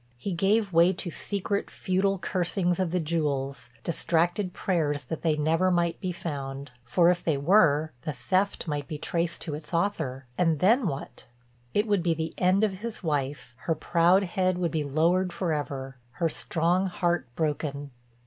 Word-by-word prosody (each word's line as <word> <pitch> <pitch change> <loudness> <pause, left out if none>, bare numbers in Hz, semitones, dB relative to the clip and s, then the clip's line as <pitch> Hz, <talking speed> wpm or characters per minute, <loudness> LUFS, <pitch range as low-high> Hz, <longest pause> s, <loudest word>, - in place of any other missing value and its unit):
He 195 +11 -4
gave 195 +3 +1
way 170 +3 +5
to 180 -1 -5
secret, 200 +3 -2
futile 195 +1 0
cursings 180 -1 0
of 185 -2 +1
the 180 +2 0
jewels, 140 -6 -2
distracted 175 +3 0
prayers 150 -7 -1
that 150 +5 -5
they 155 -2 +1
never 165 +5 +2
might 170 -2 +1
be 185 - -1
found. 140 -5 -5
For 170 +9 +4
if 175 - -2
they 155 -4 +1
were, 155 -1 +4
the 155 - -3
theft 180 +11 -1
might 145 -2 -2
be 155 - -4
traced 170 +2 -2
to 160 - -4
its 150 +3 -5
author—and 155 -4 0
then 220 - +4
what? 140 -3 -6 0.5
It 205 - +3
would 205 -4 +2
be 170 -1 +1
the 160 0 -3
end 185 +3 +3
of 210 -3 +2
his 230 -1 -5
wife, 140 -5 -2
her 165 - +2
proud 175 +5 +3
head 185 0 0
would 175 -3 0
be 160 - 0
lowered 170 +6 +2
forever, 145 -7 -3 0.2
her 165 +2 0
strong 175 +4 0
heart 175 -6 0
broken. 145 -2 -2
170 Hz, 170 wpm, -27 LUFS, 150-185 Hz, 0.5 s, way